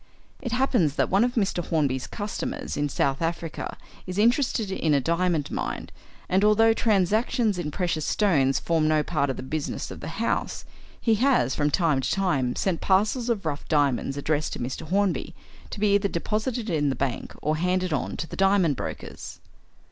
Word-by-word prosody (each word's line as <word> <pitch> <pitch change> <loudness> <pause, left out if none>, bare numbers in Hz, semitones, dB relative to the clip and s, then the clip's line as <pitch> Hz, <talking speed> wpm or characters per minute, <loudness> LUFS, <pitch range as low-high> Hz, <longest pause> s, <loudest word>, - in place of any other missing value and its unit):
It 245 - -4
happens 245 - +2
that - - 0
one 195 +4 +4
of 245 0 0
Mr. 195 -5 0
Hornby's 140 -6 0
customers 205 -1 -4
in 145 0 0
South 135 +1 0
Africa 165 -1 -3 0.3
is 185 +1 -5
interested 230 -2 +2
in 160 -5 +1
a - - +4
diamond 170 0 0
mine, - - -4 0.4
and, 190 +2 +2
although 225 +2 +5
transactions 215 0 +1
in 160 -4 -2
precious 165 -1 -1
stones 145 -11 +2
form 160 -2 +1
no 155 -1 +3
part 140 -3 0
of 135 - -2
the - - -6
business 150 +3 -4
of - - -8
the - - -7
house, 230 - -1 0.3
he 225 - +2
has, 250 - +3
from 150 0 +1
time 155 -5 +2
to - - -1
time, 145 -11 +1
sent 185 -4 -1
parcels 215 +6 +2
of 210 -6 -1
rough 145 -2 -3
diamonds 140 -2 +1
addressed 150 +1 -1
to - - -6
Mr. 130 +6 -4
Hornby, 195 +2 0 0.3
to - - -7
be 205 -1 +3
either 200 0 +3
deposited 215 +6 -2
in 145 -3 +1
the 135 - -1
bank 135 -3 -3
or 155 +1 0
handed 180 0 0
on - - -2
to - - -3
the - - -8
diamond 195 -6 +3
brokers. - - -7
175 Hz, 185 wpm, -25 LUFS, 150-205 Hz, 0.4 s, although